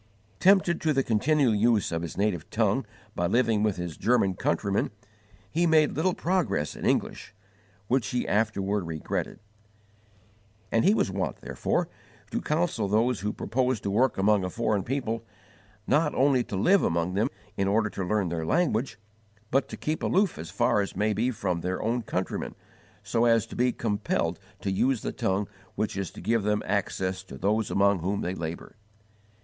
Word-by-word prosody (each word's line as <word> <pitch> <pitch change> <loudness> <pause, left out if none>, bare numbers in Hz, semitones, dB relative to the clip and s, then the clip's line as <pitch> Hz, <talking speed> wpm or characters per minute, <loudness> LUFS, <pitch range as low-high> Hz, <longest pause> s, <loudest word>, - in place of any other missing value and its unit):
Tempted 185 -3 +4
to 155 -1 +2
the 135 -1 +2
continual 130 +3 +2
use 110 -2 +2
of 85 0 -1
his 85 -2 -6
native 100 -6 -1
tongue - - +1 0.3
by 85 - 0
living 115 0 +2
with 105 -2 +1
his 90 -3 -5
German 110 -6 +2
countrymen, 100 +2 0 0.6
he 170 +2 +2
made 155 -2 +4
little 180 +4 0
progress 170 - 0
in - - -3
English, 100 - -1 0.5
which 125 0 +1
he 125 - -1
afterward 100 -3 0
regretted; 80 -2 -3 1.3
and 115 - +3
he 205 - +5
was 100 - +1
wont, 95 0 -3
therefore, - - -1 0.4
to - - -1
counsel 155 - 0
those 115 +3 +2
who 105 +1 -2
propose 125 +2 -1
to 100 - -2
work 125 +6 +2
among 100 0 +3
a 90 - -2
foreign 110 -1 0
people, 115 -1 -2 0.6
not 150 0 +2
only 135 -2 +3
to 110 - -5
live 180 - +4
among 85 +2 0
them 105 +4 +1 0.3
in 95 - 0
order 105 +1 +2
to 95 - -4
learn 100 0 0
their 80 -1 -2
language, 130 - 0 0.5
but 135 +2 +2
to - - -7
keep 155 +1 -2
aloof 195 -1 +1
as 80 - -6
far 105 - +2
as 100 - -4
may 105 +1 +1
be 115 +5 +1
from 95 -7 -2
their 90 +1 -2
own 120 +3 0
countrymen, 95 -3 -3 0.5
so 115 +1 +1
as 115 -2 +4
to - - -10
be 125 +1 +2
compelled 105 -3 -1 0.2
to 95 - -1
use 125 +4 +1
the - - -2
tongue 95 +1 -1 0.3
which 105 0 -2
is 100 -2 -3
to - - -11
give 115 0 +1
them 105 +1 0
access 95 -1 -1
to 95 -7 -11
those 105 +6 0
among 100 -1 +3
whom 100 +4 -1
they 90 - -2
labour. 85 -2 -6
105 Hz, 175 wpm, -27 LUFS, 95-125 Hz, 1.3 s, he